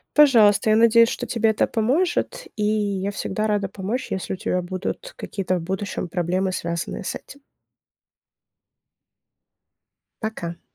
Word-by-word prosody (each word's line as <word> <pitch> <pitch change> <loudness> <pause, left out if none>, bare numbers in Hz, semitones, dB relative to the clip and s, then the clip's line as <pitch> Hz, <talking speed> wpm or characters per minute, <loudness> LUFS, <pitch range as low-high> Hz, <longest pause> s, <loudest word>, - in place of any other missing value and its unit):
Пожалуйста. 225 -8 +6
Я - - +5
надеюсь, 230 +1 +6
что - - -4
тебе 225 -2 +2
это 215 - +1
поможет, 270 +12 0
и 210 - -1
я 205 -2 0
всегда 215 +2 -2
рада 205 -2 0
помочь, 210 +6 -4
если 190 0 -3
у - - -2
тебя 180 0 -1
будут 185 - -5
какие-то 185 -2 -2
в - - -4
будущем 190 0 -4
проблемы, 185 +2 0
связанные 170 -1 -3
с - - -3
этим. 285 - -11 2.8
Пока. 175 -6 -5
205 Hz, 135 wpm, -23 LUFS, 185-225 Hz, 2.8 s, Пожалуйста